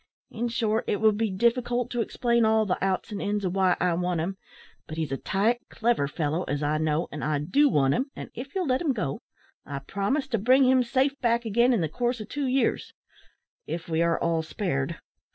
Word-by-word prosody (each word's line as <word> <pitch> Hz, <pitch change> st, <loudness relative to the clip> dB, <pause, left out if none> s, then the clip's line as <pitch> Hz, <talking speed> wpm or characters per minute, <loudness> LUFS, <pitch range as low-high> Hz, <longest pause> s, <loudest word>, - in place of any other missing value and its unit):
In 235 Hz, +2 st, -2 dB
short, 225 Hz, -1 st, 0 dB
it 205 Hz, -, 0 dB
would 220 Hz, -1 st, +4 dB
be 220 Hz, +1 st, 0 dB
difficult 240 Hz, +4 st, 0 dB
to 240 Hz, -, 0 dB
explain 235 Hz, +1 st, +1 dB
all 220 Hz, 0 st, +3 dB
the 185 Hz, -2 st, -1 dB
outs 195 Hz, +3 st, -1 dB
and 205 Hz, -, -4 dB
ins 205 Hz, -1 st, -1 dB
of 180 Hz, -, -1 dB
why 190 Hz, -2 st, +3 dB
I 180 Hz, -1 st, +2 dB
want 180 Hz, 0 st, -1 dB
him. 180 Hz, +4 st, -2 dB, 0.5 s
But 155 Hz, -, -7 dB
he's 160 Hz, -4 st, -2 dB
a 135 Hz, -, -1 dB
tight, 225 Hz, -, 0 dB
clever 230 Hz, -11 st, +1 dB
fellow, 155 Hz, +2 st, -1 dB
as 145 Hz, +1 st, -2 dB
I 150 Hz, +1 st, +1 dB
know, 155 Hz, +2 st, 0 dB
and 150 Hz, -, -6 dB
I 150 Hz, -1 st, +1 dB
do 270 Hz, -, +3 dB
want 135 Hz, -, +3 dB
him, 270 Hz, +3 st, -1 dB
and -, -, -8 dB
if 265 Hz, +6 st, -8 dB
you'll 375 Hz, -2 st, 0 dB
let 255 Hz, -2 st, +1 dB
him 305 Hz, -6 st, +1 dB
go, 160 Hz, -, -3 dB, 0.4 s
I 140 Hz, -, -6 dB
promise 200 Hz, -, -2 dB
to 230 Hz, -4 st, 0 dB
bring 255 Hz, +6 st, +5 dB
him 260 Hz, 0 st, +5 dB
safe 265 Hz, +3 st, 0 dB
back 235 Hz, -1 st, +1 dB
again 235 Hz, +4 st, +3 dB
in 230 Hz, -7 st, +2 dB
the 160 Hz, -, +1 dB
course 240 Hz, -, -1 dB
of 215 Hz, -, -8 dB
two 285 Hz, -2 st, -2 dB
years 260 Hz, +1 st, 0 dB, 0.7 s
if 165 Hz, 0 st, -5 dB
we 165 Hz, 0 st, 0 dB
are 170 Hz, 0 st, +2 dB
all 165 Hz, -1 st, +1 dB
spared. 160 Hz, -3 st, -2 dB
210 Hz, 225 wpm, -26 LUFS, 165-240 Hz, 0.7 s, bring